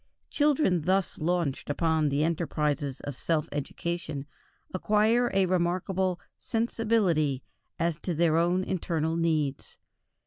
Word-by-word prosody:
Children 290 - +2
thus 190 0 +1
launched 170 -5 -1
upon 160 0 +1
the 140 +2 +1
enterprises 150 -4 -1
of 145 - -5
self 155 +2 0
education 155 0 -4 0.5
acquire 215 +5 +3
a 195 0 +3
remarkable 185 +1 0 0.2
"sensibility" 215 - +1 0.3
as 165 -2 0
to 175 0 -3
their 165 0 +3
own 175 +3 +2
internal 165 -3 -1
needs. 155 -4 -1
170 Hz, 110 wpm, -28 LUFS, 155-185 Hz, 0.5 s, acquire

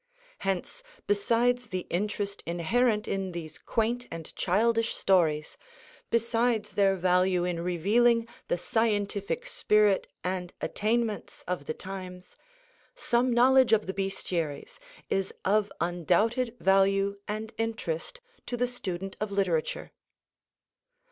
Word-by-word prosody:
Hence, 195 - -2 0.2
besides 235 +4 +2
the 185 -1 -4
interest 200 +1 -2
inherent 210 +6 +1
in 190 -2 -2
these 160 -2 -7
quaint 235 +2 -1
and 165 -1 -8
childish 225 +4 +1
stories, 160 -6 +2 0.5
besides 230 -1 +1
their 195 -1 +3
value 180 0 +2
in 175 -1 -1
revealing 225 +7 +3 0.2
the - - +1
scientific 210 - -1
spirit 210 - +2 0.2
and 180 -1 -3
attainments 220 0 -1
of 180 -5 -3
the 155 - -2
times, 185 -1 -8 0.6
some 250 - +1
knowledge 255 +1 +5
of 215 -1 +4
the 190 - -3
Bestiaries 180 -6 -3 0.3
is 195 0 -1
of 205 +1 +2
undoubted 210 +8 +1
value 195 +1 +3
and 215 +2 -4
interest 225 - -3 0.3
to 245 - -2
the 245 +1 +1
student 195 -6 -5
of 215 -1 -2
literature. 185 -6 -1
200 Hz, 115 wpm, -28 LUFS, 180-230 Hz, 0.6 s, knowledge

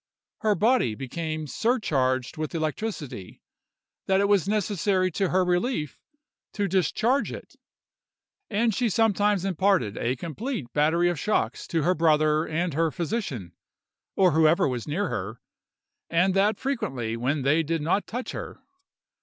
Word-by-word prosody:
Her 215 -1 +2
body 215 - +2
became 155 +5 -4
so 225 - +1
surcharged 130 - 0
with 155 +2 -4
electricity, 155 - -4 0.7
that 190 0 +3
it 200 - +3
was 200 -3 +3
necessary 200 -3 +1
to 190 +2 0
her 185 0 +2
relief 180 - -1 0.5
to 205 -2 -1
discharge 205 - +1
it; - - -10 0.9
and 225 +1 +1
she 235 +3 +1
sometimes 205 -2 +2
imparted 185 - +1
a 125 +2 0
complete 170 - -5
battery 160 +4 +3
of 175 -4 -1
shocks 215 - -1
to 165 -4 0
her 180 +4 +3
brother 155 -1 +2
and 170 +1 -1
her 165 +2 +1
physician, 150 - -4 0.6
or 185 -2 +4
whoever 160 +1 +4
was 125 -3 -3
near 180 +7 -1
her, 105 +5 -4 0.7
and 180 +3 +2
that 200 +2 +2
frequently 160 - -2
when 130 +5 -1
they 150 +4 +3
did 165 0 -2
not 180 +6 0
touch 245 +3 -4
her. - - -7
170 Hz, 145 wpm, -26 LUFS, 150-205 Hz, 0.9 s, or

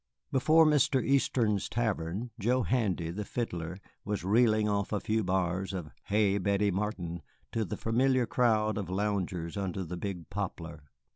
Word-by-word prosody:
Before 155 +5 +5
Mr. 145 -3 +3
Easton's 120 -6 +2
tavern 110 -1 -2
Joe 125 +4 +2
Handy, 95 -10 0
the 105 +4 -4
fiddler, 90 -7 -4 0.3
was 105 -4 -3
reeling 110 +1 +3
off 100 -1 0
a 105 - 0
few 110 +2 0
bars 95 +1 -1
of 85 -5 -5
"Hey, 100 -1 +2
Betty 100 +1 +1
Martin" 90 -4 -3 0.3
to 115 - 0
the 90 - -4
familiar 125 +2 +2
crowd 110 -3 +2
of 100 - -5
loungers 95 -4 -2
under 95 -1 -2
the 90 +1 -6
big 90 -3 -5
poplar. 85 -6 -5
100 Hz, 150 wpm, -30 LUFS, 90-115 Hz, 0.3 s, Before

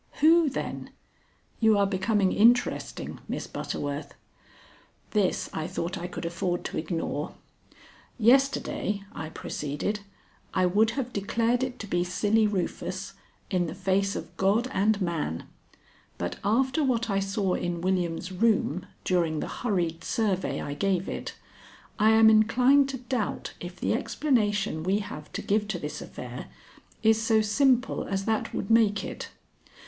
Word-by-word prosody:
"Who, 325 0 +5
then? 270 - -4 0.7
You 220 -2 +5
are 200 - +4
becoming 195 0 +1
interesting, 240 +3 +2
Miss - - -3
Butterworth." 145 0 -4 1.0
This 205 -4 +1
I 160 0 -3
thought 180 0 -3
I 175 -1 -4
could 180 - -6
afford 175 +1 -2
to - - -4
ignore. 155 -2 -3 0.8
"Yesterday," 240 -4 +2
I 160 - -5
proceeded, 150 +7 -3 0.6
"I 185 -1 +3
would 210 +5 +3
have 250 -2 -2
declared 230 +4 +1
it 255 -1 -2
to 220 - -6
be 175 -2 +1
Silly 205 +4 +2
Rufus, 195 -4 -3 0.4
in 180 -2 +1
the - - -6
face 195 +1 +1
of - - -7
God 205 +6 +2
and 205 +2 +2
man, 155 - -2 0.7
but 90 0 -3
after 260 +9 +2
what 235 -4 +1
I 195 - +2
saw 195 -1 0
in 175 -1 -2
William's 180 -1 -1
room 200 -2 +1 0.2
during 170 -4 +1
the - - -3
hurried 175 -8 -2
survey 195 -4 0
I 145 - -4
gave 190 +4 0
it, - - -5 0.6
I 215 +1 +5
am 220 0 +7
inclined 250 +6 +5
to 270 - -3
doubt 245 -3 -3
if 175 0 -8
the - - +1
explanation 215 - 0
we 190 +5 +1
have 170 -8 -7
to - - -4
give 210 +1 +1
to 210 -4 -2
this 150 -2 -5
affair - - -8 0.6
is 220 0 +4
so 225 -1 +3
simple 255 +3 +2
as 195 0 -2
that 220 -1 0
would 195 - -3
make 210 -3 +4
it. - - -6
200 Hz, 145 wpm, -27 LUFS, 180-225 Hz, 1.0 s, am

